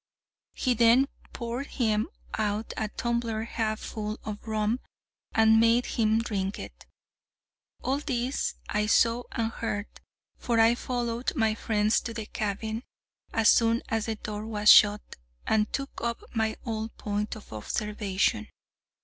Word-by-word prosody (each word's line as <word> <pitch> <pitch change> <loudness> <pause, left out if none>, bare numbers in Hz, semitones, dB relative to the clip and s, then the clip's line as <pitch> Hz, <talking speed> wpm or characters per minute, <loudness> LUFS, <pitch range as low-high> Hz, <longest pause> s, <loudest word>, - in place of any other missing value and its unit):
He 255 - +1
then 240 +3 +5 0.2
poured 240 +3 -4
him 220 -3 0 0.3
out 215 +1 -1
a 215 - -1
tumbler 235 -1 -2
half 220 -1 -2
full 215 0 -5
of 210 +1 -7
rum, 215 +2 0 0.6
and 220 0 +6
made 230 +2 +4
him 220 -1 +2
drink 200 -4 -2
it. - - -10 1.0
All 270 +2 0
this 260 -2 -1
I 210 0 0
saw 230 +2 +3
and 225 -1 -1
heard, 205 -3 -3 0.5
for 235 -2 +1
I 225 +1 +6
followed 240 +1 -2
my 220 -5 +2
friends 215 -1 +1
to 230 - -6
the 220 -2 -4
cabin 220 +2 -3 0.5
as 225 0 +4
soon 230 0 +3
as 225 -1 -1
the 225 - -1
door 210 0 -6
was 210 -1 +5
shut, 205 0 +5 0.3
and 215 -1 +2
took 275 0 -4
up 235 0 -2
my 220 -1 0
old 220 -1 -4
point 210 0 -2
of 215 - -12
observation. 210 - -1
220 Hz, 140 wpm, -28 LUFS, 210-235 Hz, 1.0 s, and